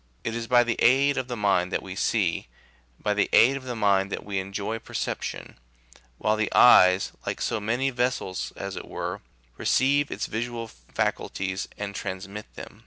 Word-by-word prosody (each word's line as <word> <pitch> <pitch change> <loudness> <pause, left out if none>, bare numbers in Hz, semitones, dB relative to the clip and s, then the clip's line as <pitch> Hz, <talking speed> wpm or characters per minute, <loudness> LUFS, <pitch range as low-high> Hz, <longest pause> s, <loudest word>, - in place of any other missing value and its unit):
It 110 - -2
is 115 0 -4
by 120 0 +5
the 120 -1 -2
aid 140 +3 +4
of 130 -1 -2
the 120 -2 -4
mind 95 -3 +1
that - - -1
we 95 -1 -7
see, 95 - 0 0.5
by 105 - 0
the 105 - +1
aid 130 +4 +6
of 135 -1 -7
the 125 -1 -4
mind 100 -2 +2
that - - -4
we 100 -2 -2
enjoy 100 +3 -4
perception; - - -5 0.6
while 105 +7 +1
the 110 0 -1
eyes, 95 -5 +7 0.2
like - - -2
so 115 - -1
many 120 +6 0
vessels, 125 -7 -2
as - - -5
it - - -7
were, - - -5 0.4
receive 140 +2 +2
its - - -3
visual 115 +1 -4
faculties 95 +9 -3
and 100 -1 -4
trans 95 0 -5
mit 105 +2 -9
them. - - -10
105 Hz, 180 wpm, -26 LUFS, 95-120 Hz, 0.6 s, eyes